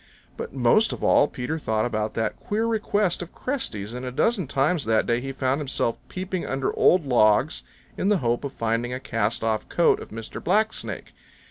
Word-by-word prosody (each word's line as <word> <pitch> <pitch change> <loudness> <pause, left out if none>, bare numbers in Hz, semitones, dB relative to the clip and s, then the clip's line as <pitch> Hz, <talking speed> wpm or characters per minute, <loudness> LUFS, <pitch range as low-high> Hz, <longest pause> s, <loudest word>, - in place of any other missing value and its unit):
But - - -6
most 135 - +3
of - - -7
all 145 - +5
Peter 140 +6 -4
thought 110 -6 0
about 110 -2 -2
that 110 -1 -2
queer 215 +2 -1
request 210 -5 0
of 175 - -8
Cresty's, 115 - -3
and 125 +1 -6
a 125 - -4
dozen 190 - +1
times 145 +4 +1
that 110 0 +2
day 120 +1 +1
he 135 +1 -4
found 135 +1 0
himself 130 -4 -1
peeping 185 -1 -4
under 135 0 -1
old 180 -4 +4
logs 120 +2 +3 0.4
in 195 - +1
the 210 - +4
hope 120 -4 0
of 140 - -3
finding 115 0 -1
a 125 - -3
cast 115 -3 -1
off 110 -1 -1
coat 170 - +3
of - - -9
Mr. 115 +1 -7
Black 215 +5 +2
Snake. - - -6
130 Hz, 200 wpm, -25 LUFS, 115-180 Hz, 0.4 s, all